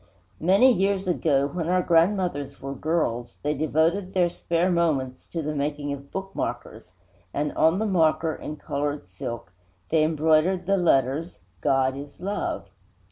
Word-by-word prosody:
II 160 Hz, -, -4 dB
Many 215 Hz, +8 st, +6 dB
years 195 Hz, -1 st, 0 dB
ago, 150 Hz, -6 st, +2 dB
when 170 Hz, +1 st, -3 dB
our 180 Hz, 0 st, +2 dB
grandmothers 170 Hz, -5 st, +1 dB
were 135 Hz, 0 st, -5 dB
girls, 130 Hz, -5 st, -1 dB
they 150 Hz, +1 st, +1 dB
devoted 160 Hz, +6 st, 0 dB
their 175 Hz, -2 st, +3 dB
spare 170 Hz, +2 st, 0 dB
moments 150 Hz, -7 st, 0 dB
to 165 Hz, -2 st, -4 dB
the 150 Hz, +1 st, -2 dB
making 145 Hz, 0 st, -2 dB
of 140 Hz, 0 st, -9 dB
bookmarkers; 195 Hz, -, -5 dB, 0.4 s
and 145 Hz, +1 st, 0 dB
on 160 Hz, +3 st, +3 dB
the 220 Hz, -, 0 dB
marker, 165 Hz, -4 st, +2 dB
in 150 Hz, -, -6 dB
colored 145 Hz, -4 st, -3 dB
silk, 100 Hz, +3 st, -7 dB, 0.4 s
they 160 Hz, -1 st, +3 dB
embroidered 160 Hz, +3 st, +2 dB
the 195 Hz, +2 st, +3 dB
letters 150 Hz, -1 st, +1 dB, 0.2 s
GOD 135 Hz, +1 st, +2 dB
IS 145 Hz, +1 st, -10 dB
LOVE. 200 Hz, +3 st, -3 dB
160 Hz, 150 wpm, -25 LUFS, 140-180 Hz, 0.4 s, Many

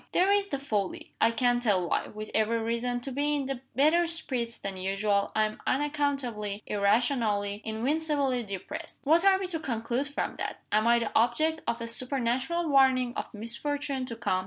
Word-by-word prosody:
"There 380 Hz, +2 st, +4 dB
is 405 Hz, 0 st, +3 dB
the 280 Hz, -, -2 dB
folly! 210 Hz, -8 st, -3 dB
I 225 Hz, -, +6 dB
can't 245 Hz, +1 st, +2 dB
tell 195 Hz, -7 st, +2 dB
why. -, -, 0 dB
With 215 Hz, 0 st, -8 dB
every 220 Hz, +1 st, +2 dB
reason 235 Hz, +2 st, -1 dB
to 270 Hz, -, -5 dB
be 290 Hz, +3 st, 0 dB
in 270 Hz, -3 st, -3 dB
better 315 Hz, +6 st, +4 dB
spirits 255 Hz, -8 st, -3 dB
than 195 Hz, -1 st, -5 dB
usual, 200 Hz, +2 st, 0 dB
I 215 Hz, -, +4 dB
am 215 Hz, 0 st, -6 dB
unaccountably, 270 Hz, -8 st, -1 dB
irrationally, 205 Hz, -1 st, +1 dB
invincibly 270 Hz, +3 st, 0 dB
depressed. 200 Hz, -4 st, -7 dB
What 325 Hz, +5 st, +4 dB
are 390 Hz, -1 st, +6 dB
we 385 Hz, -, -3 dB
to 330 Hz, -3 st, -2 dB
conclude 240 Hz, 0 st, -2 dB
from 285 Hz, -, -3 dB
that? -, -, -5 dB
Am 215 Hz, +2 st, +3 dB
I 235 Hz, 0 st, +6 dB
the 230 Hz, -2 st, -1 dB
object 310 Hz, +7 st, +2 dB
of 235 Hz, -, -1 dB
a 230 Hz, -, -3 dB
supernatural 260 Hz, +7 st, -1 dB
warning 260 Hz, -3 st, +4 dB
of -, -, -4 dB
misfortune 265 Hz, +4 st, -3 dB
to 230 Hz, -, -5 dB
come? 205 Hz, -5 st, 0 dB
245 Hz, 180 wpm, -29 LUFS, 220-285 Hz, -, I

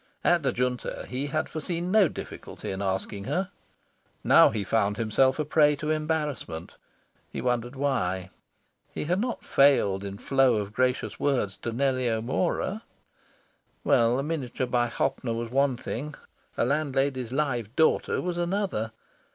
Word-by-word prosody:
At 175 Hz, -1 st, +4 dB
the 140 Hz, -, +1 dB
Junta, 125 Hz, 0 st, -2 dB
he 130 Hz, +3 st, -3 dB
had 155 Hz, +2 st, -1 dB
foreseen 170 Hz, +3 st, -3 dB
no 210 Hz, -3 st, +6 dB
difficulty -, -, -7 dB
in 95 Hz, +1 st, -4 dB
asking 100 Hz, +1 st, -2 dB
her. 185 Hz, -, -1 dB, 0.7 s
Now -, -, +7 dB
he 110 Hz, -2 st, -2 dB
found 105 Hz, 0 st, +1 dB
himself 125 Hz, +4 st, +2 dB
a 155 Hz, -, -1 dB
prey 150 Hz, 0 st, +4 dB
to 150 Hz, +2 st, -2 dB
embarrassment. 150 Hz, -, -2 dB, 0.6 s
He -, -, -5 dB
wondered 120 Hz, 0 st, -1 dB
why. 95 Hz, -10 st, -1 dB, 0.6 s
He -, -, -4 dB
had 180 Hz, +4 st, +1 dB
not 245 Hz, 0 st, -3 dB
failed 105 Hz, -9 st, +4 dB
in 100 Hz, 0 st, -6 dB
flow 135 Hz, +1 st, +3 dB
of 105 Hz, -1 st, -3 dB
gracious 125 Hz, +2 st, 0 dB
words 125 Hz, -9 st, 0 dB
to 120 Hz, -, -4 dB
Nellie 130 Hz, 0 st, +1 dB
O'Mora. 135 Hz, -, -1 dB, 1.0 s
Well, 120 Hz, +1 st, +3 dB
a 135 Hz, -, -1 dB
miniature 140 Hz, -5 st, -2 dB
by 120 Hz, -1 st, +1 dB
Hoppner 130 Hz, 0 st, -1 dB
was 115 Hz, 0 st, -4 dB
one 135 Hz, -1 st, +2 dB
thing, 145 Hz, +5 st, -5 dB, 0.4 s
a -, -, +2 dB
landlady's 135 Hz, -3 st, 0 dB
live 130 Hz, -5 st, -1 dB
daughter 160 Hz, -, +2 dB
was 175 Hz, -1 st, -2 dB
another. 175 Hz, -, -1 dB
130 Hz, 150 wpm, -27 LUFS, 115-150 Hz, 1.0 s, Now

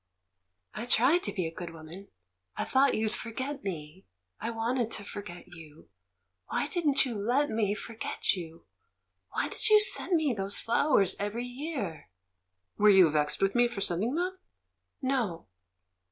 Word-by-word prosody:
"I 225 Hz, +4 st, -5 dB
tried 265 Hz, +9 st, +4 dB
to -, -, -1 dB
be 185 Hz, -4 st, -2 dB
a 160 Hz, -, -4 dB
good 175 Hz, 0 st, -6 dB
woman 165 Hz, +4 st, -9 dB, 0.3 s
— 90 Hz, 0 st, -36 dB
I -, -, 0 dB
thought 270 Hz, +1 st, +3 dB
you'd 215 Hz, 0 st, 0 dB
forget 260 Hz, +5 st, -5 dB
me; 170 Hz, -1 st, -6 dB, 0.3 s
I -, -, -3 dB
wanted 230 Hz, +1 st, -1 dB
to 205 Hz, -, -2 dB
forget 200 Hz, -3 st, -8 dB
you. 160 Hz, -3 st, -14 dB, 0.6 s
Why -, -, -1 dB
didn't 300 Hz, -4 st, +2 dB
you 250 Hz, -, -3 dB
let 245 Hz, +8 st, +1 dB
me 210 Hz, -2 st, +1 dB
forget 225 Hz, +2 st, -1 dB
you? 165 Hz, -2 st, -9 dB, 0.7 s
Why -, -, 0 dB
did -, -, +1 dB
you 425 Hz, 0 st, +8 dB
send 410 Hz, -3 st, +2 dB
me 310 Hz, -5 st, +2 dB
those 195 Hz, -1 st, -1 dB
flowers 230 Hz, -, +2 dB
every 210 Hz, +4 st, -2 dB
year?" 245 Hz, -, -5 dB, 0.7 s
"Were 210 Hz, +1 st, +6 dB
you 190 Hz, -5 st, +7 dB
vexed 150 Hz, +4 st, +1 dB
with 195 Hz, 0 st, +2 dB
me 240 Hz, 0 st, +4 dB
for 235 Hz, -4 st, -6 dB
sending 200 Hz, -, 0 dB
them?" 365 Hz, +2 st, -2 dB, 0.6 s
"No." 245 Hz, -11 st, -1 dB
215 Hz, 160 wpm, -29 LUFS, 180-260 Hz, 0.7 s, you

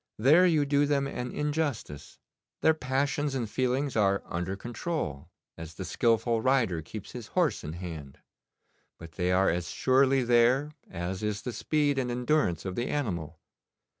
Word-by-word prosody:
'There 155 Hz, +11 st, +6 dB
you 155 Hz, -4 st, +3 dB
do 145 Hz, 0 st, +2 dB
them 140 Hz, -1 st, +1 dB
an 125 Hz, -2 st, -4 dB
injustice. 145 Hz, -, -3 dB, 0.4 s
Their 160 Hz, -, +5 dB
passions 140 Hz, 0 st, -1 dB
and 120 Hz, -4 st, -1 dB
feelings 130 Hz, +4 st, -1 dB
are 100 Hz, -2 st, +2 dB
under 90 Hz, +3 st, -3 dB
control, 100 Hz, -, -4 dB, 0.3 s
as 80 Hz, -1 st, -8 dB
the 95 Hz, -, -6 dB
skilful 115 Hz, +4 st, +1 dB
rider 115 Hz, -10 st, +2 dB
keeps 100 Hz, +6 st, -9 dB
his 120 Hz, -3 st, -8 dB
horse 160 Hz, -, +2 dB
in 75 Hz, -, -5 dB
hand; 80 Hz, -6 st, -8 dB, 0.8 s
but 85 Hz, -1 st, -11 dB
they 90 Hz, +3 st, -1 dB
are 95 Hz, 0 st, +3 dB
as 85 Hz, -1 st, -3 dB
surely 130 Hz, 0 st, +3 dB
there 120 Hz, +5 st, +3 dB, 0.2 s
as 90 Hz, +2 st, -4 dB
is 105 Hz, -1 st, -2 dB
the 125 Hz, -, -4 dB
speed 145 Hz, -1 st, +1 dB
and 125 Hz, -2 st, -1 dB
endurance 125 Hz, -, 0 dB
of 95 Hz, -, -3 dB
the 120 Hz, +6 st, -2 dB
animal. 85 Hz, -, -3 dB
120 Hz, 160 wpm, -28 LUFS, 90-140 Hz, 0.8 s, There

